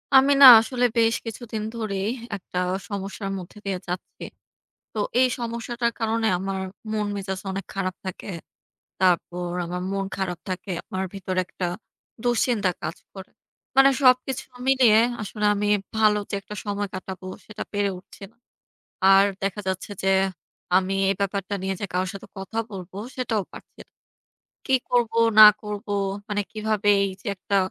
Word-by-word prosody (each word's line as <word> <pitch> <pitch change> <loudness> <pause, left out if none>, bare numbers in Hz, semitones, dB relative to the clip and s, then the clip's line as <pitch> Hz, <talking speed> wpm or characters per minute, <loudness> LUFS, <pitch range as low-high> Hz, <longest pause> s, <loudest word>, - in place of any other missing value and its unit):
আমি 270 +1 +7
না 275 - +12
আসলে 245 +2 0
বেশ 230 0 +4
কিছুদিন 225 -1 -5
ধরেই 205 -2 -2 0.3
একটা 180 -2 -8 0.3
সমস্যার 195 0 -4
মধ্যে 180 +4 -11
দিয়ে 190 -2 -2
যাচ্ছি। 180 +1 -6 0.7
তো 215 - -3 0.2
এই 255 - +6
সমস্যাটার 235 0 -2
কারণে 225 0 0
আমার 195 0 -3 0.3
মন 210 -1 -1
মেজাজ 190 -1 -4
অনেক 190 -1 -4
খারাপ 185 -2 -2
থাকে। 185 +2 -6 0.7
তারপর 175 -1 +1
আমার 180 +1 -4
মন 195 0 -1
খারাপ 185 -3 -2
থাকে। 185 +1 -4 0.2
আমার 190 0 -2
ভিতরে 185 -1 -3
একটা 180 - -4 0.6
দুশ্চিন্তা 240 -4 +2
কাজ 160 - -4 0.2
করে। 190 -2 -10 0.5
মানে 270 0 +8
সবকিছু 255 0 +3 0.2
মিলিয়ে 250 -5 +6 0.2
আসলে 210 +1 -4
আমি 205 0 -1 0.3
ভালো 215 -1 +4
যে - - -2
একটা 210 - -9
সময় 205 0 -2
কাটাবো 185 0 -7 0.2
সেটা 215 0 -7
পেরে 205 -1 +1
উঠছি 185 - -17
না। - - -36 0.8
আর 195 +1 +7 0.2
দেখা 200 +1 -2
যাচ্ছে 190 +2 -3
যে, - - +1 0.7
আমি 190 +1 0 0.2
এই 195 - +1
ব্যাপারটা 200 0 -2
নিয়ে 190 0 -1
যে - - 0
কারো 180 +1 +1
সাথে 195 - -9
কথা 195 +4 -6
বলবো 185 -1 -8 0.2
সেটাও 230 -5 -1
পারছি - - -14
না। - - -43 0.8
কি 265 - +2
করব 240 -2 +2 0.3
না - - +14 0.2
করব, 210 -1 -6 0.4
মানে 205 -1 0
কিভাবে 215 -1 -1
এই 195 - 0
যে - - -13
একটা 200 +2 -1
200 Hz, 155 wpm, -24 LUFS, 190-225 Hz, 0.8 s, না